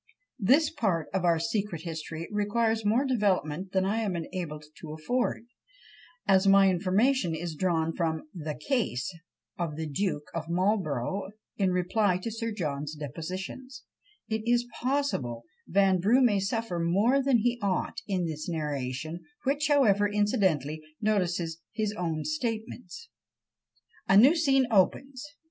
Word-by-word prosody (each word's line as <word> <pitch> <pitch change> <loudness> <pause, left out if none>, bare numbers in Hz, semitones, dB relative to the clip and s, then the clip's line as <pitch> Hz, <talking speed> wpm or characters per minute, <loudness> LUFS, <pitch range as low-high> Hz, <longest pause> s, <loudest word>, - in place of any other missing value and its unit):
This 275 +9 +4
part 195 - -1
of 190 -2 0
our 170 -1 +4
secret 200 -2 -2
history 165 0 -5
requires 220 +2 +1
more 225 +7 +2
development 190 - 0
than 190 0 +1
I 210 +4 0
am 205 -5 -1
enabled 165 -3 -5
to 155 -2 -7
afford: 235 +9 -1 0.8
as 195 0 +4
my 195 -1 +6
information 185 +2 +2
is 165 +1 -4
drawn 165 -1 0
from 160 -2 -1
"the 155 -4 -5
Case" 190 - -1 0.5
of 165 -4 -2
the 160 +1 -3
Duke 155 0 -1
of 165 -1 -4
Marlborough 185 - 0 0.3
in 195 -2 +1
reply 180 +2 +1
to 205 +5 -5
Sir 230 +1 -3
John's 150 -6 -3
depositions, 185 - -6 0.4
it 220 0 -1
is 240 +1 +2 0.2
possible 245 - -1 0.2
Vanbrugh 195 +6 +4
may 210 -5 +4
suffer 195 -2 -2
more 200 +11 +3
than 265 -2 +3
he 240 +2 0
ought 195 -3 -1
in 185 -4 0
this 155 +2 -4
narration; 150 0 -3 0.2
which, 285 +3 +1
however, 210 -9 +4
incidentally 185 -8 +1 0.2
notices 175 -6 0
his 215 -2 -1
own 165 -5 -2
statements. 250 - -4 1.0
A 195 - +7
new 265 +10 +7
scene 270 -5 +3
opens! 255 +7 +2
190 Hz, 135 wpm, -28 LUFS, 165-225 Hz, 1.0 s, A